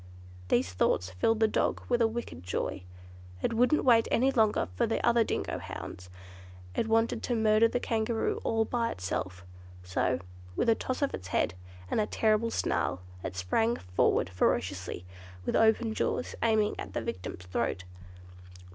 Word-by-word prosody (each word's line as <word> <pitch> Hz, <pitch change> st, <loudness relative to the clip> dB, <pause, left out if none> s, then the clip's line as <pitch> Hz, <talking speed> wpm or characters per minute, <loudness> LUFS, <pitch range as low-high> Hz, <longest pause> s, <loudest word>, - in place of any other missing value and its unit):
These 105 Hz, -1 st, +1 dB
thoughts 90 Hz, +1 st, +1 dB
filled 215 Hz, -, +1 dB
the 220 Hz, -, +6 dB
dog -, -, 0 dB
with 240 Hz, -1 st, +2 dB
a 230 Hz, -, +5 dB
wicked 225 Hz, -, -5 dB
joy. 90 Hz, 0 st, -3 dB, 0.6 s
It -, -, +1 dB
wouldn't 250 Hz, +7 st, +3 dB
wait 230 Hz, -3 st, +5 dB
any 260 Hz, +3 st, +3 dB
longer 220 Hz, -5 st, +2 dB
for -, -, +2 dB
the 225 Hz, -, 0 dB
other 235 Hz, -1 st, +5 dB
dingo -, -, -2 dB
hounds. 90 Hz, 0 st, -8 dB, 0.6 s
It 225 Hz, -, 0 dB
wanted 225 Hz, +1 st, +2 dB
to 245 Hz, -, -1 dB
murder 220 Hz, 0 st, +4 dB
the 245 Hz, -, -1 dB
Kangaroo 225 Hz, -1 st, -1 dB
all 225 Hz, 0 st, +1 dB
by 235 Hz, -1 st, 0 dB
itself; 90 Hz, 0 st, -4 dB, 0.4 s
so, 90 Hz, +7 st, 0 dB, 0.4 s
with -, -, +1 dB
a -, -, +7 dB
toss 255 Hz, +5 st, -3 dB
of 280 Hz, -, 0 dB
its 90 Hz, -, -6 dB
head, 85 Hz, -1 st, +1 dB, 0.4 s
and -, -, +2 dB
a 210 Hz, -, 0 dB
terrible 220 Hz, +1 st, +2 dB
snarl, 90 Hz, -, -1 dB, 0.2 s
it 90 Hz, -, -4 dB
sprang 225 Hz, -, +1 dB
forward 90 Hz, 0 st, +1 dB
ferociously, 90 Hz, 0 st, -1 dB, 0.4 s
with -, -, 0 dB
open 225 Hz, 0 st, +3 dB
jaws, 250 Hz, -, -1 dB
aiming 220 Hz, -2 st, +2 dB
at -, -, -6 dB
the -, -, -1 dB
victim's 90 Hz, -5 st, -5 dB
throat. 95 Hz, 0 st, -2 dB
220 Hz, 165 wpm, -30 LUFS, -, 0.6 s, a